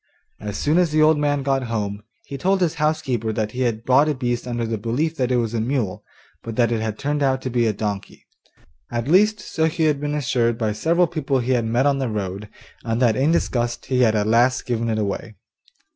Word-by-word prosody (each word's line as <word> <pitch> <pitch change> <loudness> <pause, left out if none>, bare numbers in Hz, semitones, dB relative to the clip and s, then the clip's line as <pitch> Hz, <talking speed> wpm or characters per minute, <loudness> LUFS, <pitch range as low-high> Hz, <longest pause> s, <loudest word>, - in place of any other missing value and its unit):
As 105 -2 -5
soon 155 +4 +2
as 175 -2 +3
the 155 0 +3
old 155 -1 +4
man 145 -1 0
got 135 -1 0
home, 105 -3 -3 0.2
he 140 - -7
told 190 +8 +1
his 175 -4 +1
housekeeper 130 -7 0
that 110 0 -2
he 125 - -4
had 115 -2 -1
bought 140 +4 +4
a 150 - 0
beast 120 -1 -2
under 120 -1 -2
the 110 -1 -3
belief 140 +10 -1
that 130 -1 0
it - - +3
was 115 -2 -1
a 115 - 0
mule, 115 -5 -2 0.4
but 115 -1 -7
that 120 0 +2
it 115 -2 0
had 110 -1 -3
turned 145 +1 -2
out 135 -1 +2
to 130 - -3
be 120 -1 +2
a - - +2
donkey 105 -1 -5 0.6
at 120 +1 -3
least, 210 +6 +4
so 160 -5 -1
he 160 +1 0
had 150 -2 +2
been 145 0 -2
assured 120 -5 0
by 110 -3 0
several 165 +12 +2
people 150 -5 -1
he 125 0 -1
had 120 -3 +1
met 120 +4 +1
on 140 -1 +2
the 130 -3 -1
road, 100 -1 -4 0.3
and 115 0 -1
that 120 -4 +3
in 140 +5 +2
disgust 120 -7 -1
he 130 -1 +1
had 110 -3 +4
at 105 -1 +1
last 120 +4 +2
given 115 -1 -1
it 110 - 0
away. 105 +1 -3
125 Hz, 235 wpm, -22 LUFS, 115-145 Hz, 0.6 s, old